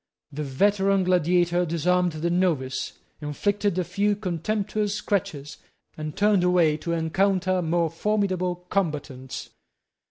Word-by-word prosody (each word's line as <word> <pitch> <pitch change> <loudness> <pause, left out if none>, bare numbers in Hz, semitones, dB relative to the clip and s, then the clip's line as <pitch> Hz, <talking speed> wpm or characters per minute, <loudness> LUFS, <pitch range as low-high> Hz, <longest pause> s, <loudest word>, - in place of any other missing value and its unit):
The 150 - -5
veteran 195 +7 +2
gladiator 175 0 +2
disarmed 175 +1 +1
the 160 +2 -2
novice, 165 -8 0 0.3
inflicted 200 +6 -1
a 185 - +2
few 200 +4 0
contemptuous 205 +2 -2
scratches, 185 -9 -2 0.4
and 155 -1 -6
turned 205 -3 +3
away 175 -4 +4
to 170 +2 -3
encounter 185 +3 +1
more 165 -1 0
formidable 185 -2 -1
combatants. 145 -8 -3
180 Hz, 115 wpm, -25 LUFS, 160-195 Hz, 0.4 s, away